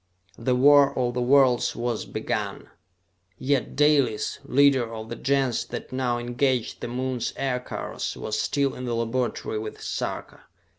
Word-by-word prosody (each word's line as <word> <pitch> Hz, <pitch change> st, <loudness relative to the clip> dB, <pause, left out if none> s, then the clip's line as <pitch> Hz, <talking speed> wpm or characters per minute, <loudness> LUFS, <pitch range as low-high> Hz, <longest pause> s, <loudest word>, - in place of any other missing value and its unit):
The 125 Hz, +2 st, +1 dB
war 140 Hz, +2 st, +5 dB
of 125 Hz, -1 st, 0 dB
the 125 Hz, -, -1 dB
worlds 130 Hz, -1 st, +4 dB
was 120 Hz, -1 st, -2 dB
begun! -, -, -4 dB, 0.7 s
Yet 135 Hz, -3 st, -1 dB
Dalis, 145 Hz, -7 st, +2 dB
leader 135 Hz, -3 st, +3 dB
of 110 Hz, 0 st, -7 dB
the 115 Hz, -, -4 dB
Gens 135 Hz, -1 st, +1 dB
that -, -, -7 dB
now 130 Hz, -2 st, 0 dB
engaged 120 Hz, 0 st, -1 dB
the -, -, -3 dB
Moon's 125 Hz, 0 st, -2 dB
aircars, 125 Hz, -2 st, -3 dB
was 110 Hz, -, -2 dB
still 140 Hz, -2 st, 0 dB
in 125 Hz, -, -6 dB
the 120 Hz, -1 st, -1 dB
laboratory 115 Hz, -1 st, -2 dB
with 110 Hz, 0 st, -7 dB
Sarka. -, -, -5 dB
125 Hz, 145 wpm, -25 LUFS, 120-135 Hz, 0.7 s, war